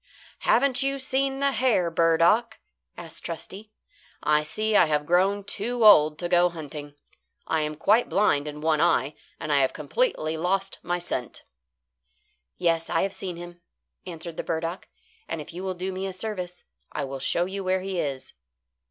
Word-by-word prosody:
"Haven't 270 +1 +2
you 275 0 0
seen 270 +1 -1
the 280 0 +3
hare, 225 -11 +2
burdock?" 165 +8 +3 0.4
asked 165 -1 -10
Trusty. 195 +5 -7 0.5
"I 150 0 +3
see 215 +8 -1
I 170 - +6
have 150 -1 0
grown 190 +5 +2
too 225 +4 -1
old 155 -7 +7
to 175 - -3
go 175 0 +4
hunting. 150 -3 -8 0.5
I 160 - 0
am 150 0 -2
quite 215 +9 +3
blind 150 -8 +2
in 150 0 -7
one 155 -1 +2
eye, 135 0 +2 0.3
and 155 -1 -2
I 140 - +4
have 130 - +1
completely 160 - -1
lost 195 +4 -1
my 175 0 -1
scent." 175 - -4 1.1
"Yes, 165 -2 +1
I 165 - +1
have 195 0 -2
seen 190 -2 -4
him," 175 0 -10 0.5
answered 170 -1 -7
the - - -3
burdock; 165 +2 -3 0.4
"and 165 - -4
if 150 +3 -9
you 180 +2 -6
will 190 -1 -3
do 185 +2 -3
me 190 +1 -4
a 190 - -5
service, 185 -3 -4 0.3
I 150 - -3
will 135 0 -6
show 170 +6 +1
you 195 +1 -5
where 185 0 +1
he 190 -1 -3
is." 135 -4 -4
175 Hz, 175 wpm, -26 LUFS, 160-200 Hz, 1.1 s, old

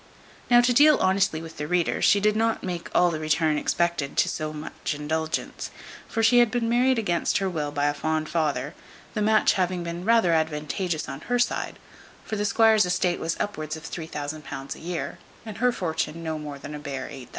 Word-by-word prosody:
Now 240 0 +7
to 245 0 +3
deal 295 +3 +7
honestly 190 -4 +1
with 165 -1 -10
the 150 - -4
reader, 175 0 0
she 205 - +5
did 210 +1 +2
not 225 +1 0
make 175 -2 -4
all 175 -1 +5
the 155 - -3
return 155 0 +1
expected 170 -5 -1
to - - +4
so 155 0 -3
much 155 0 -5
indulgence; 160 +2 -3 0.4
for 225 - -1
she 245 +2 +6
had 240 -2 +5
been 235 +1 -1
married 250 +2 +3
against 175 -6 +1
her 195 - 0
will 155 -5 -2
by 145 0 0
a 145 - +2
fond 155 +1 -1
father, 150 -2 -1 0.4
the 215 - -2
match 215 +1 +4
having 180 -1 -1
been 170 +1 -5
rather 225 -5 +4
advantageous 155 +1 -1
on 135 0 -7
her 245 - +2
side; 245 - -1 0.5
for 220 - -3
the 210 0 -1
squire's 220 -1 +4
estate 180 0 +1
was 165 0 -2
upward 155 -6 -3
of 160 - -12
£3000 150 -4 -6
a - - -13
year, 175 +1 -4 0.3
and 215 -3 -8
her 250 +1 +3
fortune 165 -4 -3
no 160 -1 -3
more 145 -2 -7
than 145 +2 -8
a 150 - -6
bare 140 -3 -5
£8000. 130 -2 -9
170 Hz, 205 wpm, -25 LUFS, 155-210 Hz, 0.5 s, Now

